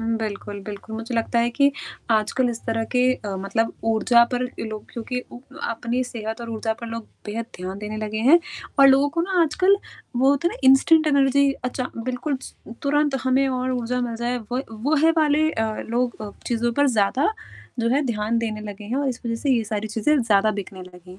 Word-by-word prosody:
उम, 225 0 0
बिल्कुल, 205 -2 -5
बिल्कुल, 210 +1 -7
मुझे 230 +2 -5
लगता 230 +1 0
है 235 +1 +2
कि 280 +3 +3 0.4
आजकल 225 +3 +2
इस 230 - -6
तरह 225 0 0
के 250 - +4
अ, 205 -5 -6
मतलब 195 +4 -1 0.2
ऊर्जा 235 +2 +5
पर 245 - 0 0.2
लोग 215 -1 -6
क्योंकि 250 +2 -4
उ - - -8 0.3
अपनी 240 +2 -1
सेहत 225 -2 -5
और 235 -1 -6
ऊर्जा 220 0 -1
पर 235 - -6
लोग 230 -1 -6 0.2
बेहद 225 +2 -4
ध्यान 185 +2 -6
देने 210 +1 -5
लगे 215 0 -3
हैं 340 - +9 0.4
और 275 - +9
लोगों 270 +2 +5
को - - +3
ना 365 0 +1
आजकल 370 +5 +3 0.4
वो 265 +2 +4
होता 285 +4 +2
है - - -7
ना - - -10
इंस्टेंट 310 +4 +6
एनर्जी 280 -1 +4
अचा 250 0 -2 0.2
बिल्कुल 260 +3 -2
स - - -10 0.3
तुरंत 295 0 +2
हमें 260 +1 +3
और 255 0 -1
ऊर्जा 250 0 -1
मिल 235 -2 -2
जाए 240 +1 -1 0.2
वो 255 - +1 0.2
वो 295 +5 +2
हे 325 - +7
वाले 310 0 +3
अ, 225 - -1 0.2
लोग 235 -3 -2
चीज़ों 235 0 0
पर 285 - +5
ज़्यादा 250 - +2 0.5
जो 230 - +1
है 280 +5 +2
ध्यान 220 0 0
देने 220 -2 -3
लगे 210 0 -8
हैं 230 +5 -3
और 280 0 0
इस 250 - -4
वजह 230 - -1
से 285 - 0
ये 235 -4 +2
सारी 215 0 -3
चीज़ें 225 +8 +2
ज़्यादा 215 -2 +3
बिकने 195 -2 -6
लगी 180 0 -14
हैं। 185 - -12
235 Hz, 210 wpm, -23 LUFS, 215-270 Hz, 0.5 s, हैं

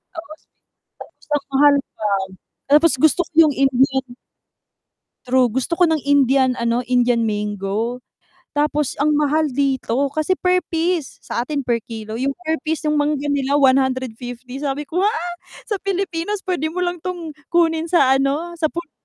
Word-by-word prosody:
Oo, 325 -1 -8 0.7
tapos - - -14
ang 285 - -1
mahal 285 +1 +5 0.2
pa, 210 -1 -2 0.6
tapos 305 +2 +5
gusto 315 +4 +4
ko - - -49 0.2
yung 285 - -2
Indian 270 0 +2 1.2
True, 255 -1 +3
gusto 260 +8 -2
ko 350 -2 +5
ng 315 -3 +1
Indian 270 -2 +3
ano, 235 +1 0
Indian 245 -2 +2
mango. 210 +3 -2 0.5
Tapos 295 -1 -1
ang 300 +1 +2
mahal 300 +1 +2
dito, 270 -1 0
kasi 310 +5 0
per 365 0 +2
piece, 330 -2 -2
sa - - -3
atin 280 +3 -2
per 235 -2 0
kilo, 220 0 -6
yung 275 +1 -1
per 320 0 -1
piece 320 0 -1
yung 300 -1 +1
mangga 290 -1 0
nila 280 0 0
₱150 260 -2 0
sabi 285 0 -2
ko, 320 +5 -3
"ha!?", 420 +3 +2 0.5
sa 415 -4 -3
Pilipinas 390 0 -2
p'wede 350 -5 -1
mo 360 +3 -3
lang 350 0 -2
'tong 345 -2 -5 0.2
kunin 330 -1 +1
sa 315 -7 +4
ano 295 +6 -1
sa 315 - +2
puno 335 +1 -7
285 Hz, 160 wpm, -20 LUFS, 255-320 Hz, 1.2 s, mahal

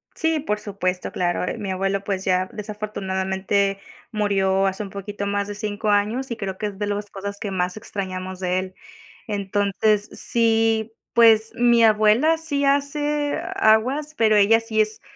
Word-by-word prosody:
Sí, 320 -1 0
por 210 -7 -2
supuesto, 185 -3 -3
claro, 175 0 -1
eh, - - -4
mi 195 -2 -4
abuelo, 195 +1 -1
pues 195 -1 -3
ya, 185 0 +1
desafortunadamente 195 -2 -2 0.3
murió 195 -2 +1
hace 190 +2 -2
un 200 - -8
poquito 200 +1 -6
más 200 0 -1
de 205 - -6
5 210 0 -3
años, 215 +6 0
y 235 - -1
creo 190 -2 -5
que 215 - -4
es 205 -2 -5
de 205 - -1
los 205 0 -3
cosas 200 +1 -6
que 205 - -4
más 180 0 -2
extrañamos 185 -3 -5
de 185 0 0
él. 185 0 -7 0.5
Entonces, 205 0 0
sí, 225 -1 +1 0.2
pues, 225 -2 +5
mi 240 -1 +4
abuela 220 +9 +4
sí 290 -3 0
hace 290 +1 0 0.2
aguas, 255 +8 +2
pero 220 -2 +4
ella 210 +3 +5
sí 225 -1 0
es, 215 0 -3
205 Hz, 165 wpm, -22 LUFS, 195-225 Hz, 0.5 s, pues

